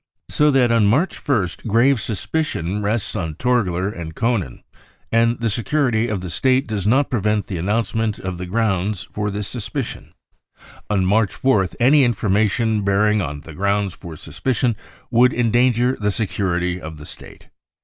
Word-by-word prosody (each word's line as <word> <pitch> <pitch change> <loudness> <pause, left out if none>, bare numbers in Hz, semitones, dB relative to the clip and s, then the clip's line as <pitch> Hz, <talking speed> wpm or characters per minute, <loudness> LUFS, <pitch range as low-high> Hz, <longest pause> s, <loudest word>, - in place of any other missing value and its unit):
So 150 0 +3
that 130 -4 +3
on 115 -3 +4
March 145 - +1
1st 110 - -1
grave 115 +3 +3
suspicion 105 - -2
rests 105 +1 -1
on 80 -7 -3
Torgler 95 -5 0
and 85 -5 -6
Koenen, 110 - -1 0.5
and 115 +1 +2
the 115 - 0
security 120 0 0
of 105 -5 -2
the 90 - -5
State 130 - +2
does 105 -2 -3
not 135 +6 +2
prevent 105 -3 0
the 95 -5 -5
announcement 110 +3 -1
of 95 -1 -5
the 90 - -5
grounds 100 -3 0
for 105 0 -2
this 100 0 -4
suspicion. 125 +2 -5 0.7
On 100 -3 +1
March 105 +1 +1
4th 105 -10 +2
any 135 +4 +5
information 110 -1 +1
bearing 105 +2 +2
on 75 -4 -4
the 80 - -11
grounds 100 +2 0
for 85 -2 -10
suspicion 110 - -1 0.4
would 125 +1 +4
endanger 120 +1 +2
the 105 -1 -1
security 90 -4 -1
of 80 0 -8
the 75 - -10
State. - - -11
105 Hz, 160 wpm, -20 LUFS, 95-120 Hz, 0.7 s, any